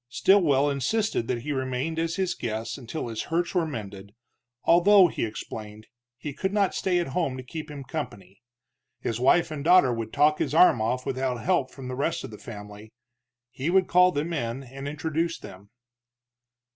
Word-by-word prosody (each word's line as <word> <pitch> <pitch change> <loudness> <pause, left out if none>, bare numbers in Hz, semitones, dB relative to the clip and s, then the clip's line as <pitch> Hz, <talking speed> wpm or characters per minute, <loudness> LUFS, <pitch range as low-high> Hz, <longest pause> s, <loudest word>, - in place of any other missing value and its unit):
Stilwell 145 -4 +4
insisted 140 - 0
that 120 -2 -2
he 150 - -3
remain 130 +4 -2
as 165 0 -1
his 190 -2 0
guest 110 0 -4
until 130 +2 -5
his 115 -2 -4
hurts 170 +1 0
were 175 -3 +1
mended, 100 -6 -8 0.5
although, 185 +2 +6
he - - -3
explained, 110 -1 -8 0.3
he 145 +2 -6
could 190 +7 -2
not 200 -2 +1
stay 185 -2 0
at 175 -4 -1
home 135 -2 -1
to 130 - -7
keep 155 +4 -7
him 145 -2 -7
company. 115 - -7 0.6
His 115 0 -3
wife 160 +6 +3
and 145 -2 -5
daughter 170 -7 +5
would 115 -1 -4
talk 150 +1 +3
his - - -1
arm 160 -9 +6
off 125 +3 -1
without 130 -2 -1
help 175 -8 +1
from 130 -1 -10
the 130 - -4
rest 140 +5 -1
of - - -7
the 105 - -10
family. 105 -1 -10 0.6
He 135 +5 -3
would 190 +1 +4
call 180 0 +5
them 155 +3 -2
in 125 -3 -3
and 135 +2 -8
introduce 160 +3 -2
them. 95 +2 -12
140 Hz, 185 wpm, -26 LUFS, 120-165 Hz, 0.6 s, although